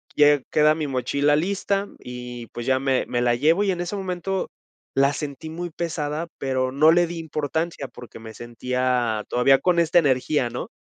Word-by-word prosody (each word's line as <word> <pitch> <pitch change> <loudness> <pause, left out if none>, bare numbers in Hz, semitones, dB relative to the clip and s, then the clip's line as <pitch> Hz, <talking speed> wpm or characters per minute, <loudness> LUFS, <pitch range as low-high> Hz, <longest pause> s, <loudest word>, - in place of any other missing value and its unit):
lle 145 -2 +5
queda 150 0 +5
mi 155 -2 -3
mochila 140 +3 +1
lista 200 +4 0
y 125 -1 -8
pues 120 +1 -7
ya 130 0 +2
me 135 -1 +1
me 120 0 -1
la 120 -1 +3
llevo 160 +10 +3
y 195 - +2
en 180 - -3
ese 175 +3 -3
momento 190 0 -3 0.5
la 140 +1 +3
sentí 150 +2 -6
muy 175 +1 -5
pesada, 160 -1 -3
pero 130 -1 -1
no 155 +4 +5
le 175 +1 +4
di 170 0 -6
importancia 160 -1 -3
porque 120 -3 -12
me 110 0 -10
sentía 120 -1 -1
todavía 135 +2 +4
con 180 -2 +2
esta 170 +1 +4
energía, 130 -2 +1
¿no? - - -5
145 Hz, 185 wpm, -23 LUFS, 125-170 Hz, 0.5 s, lle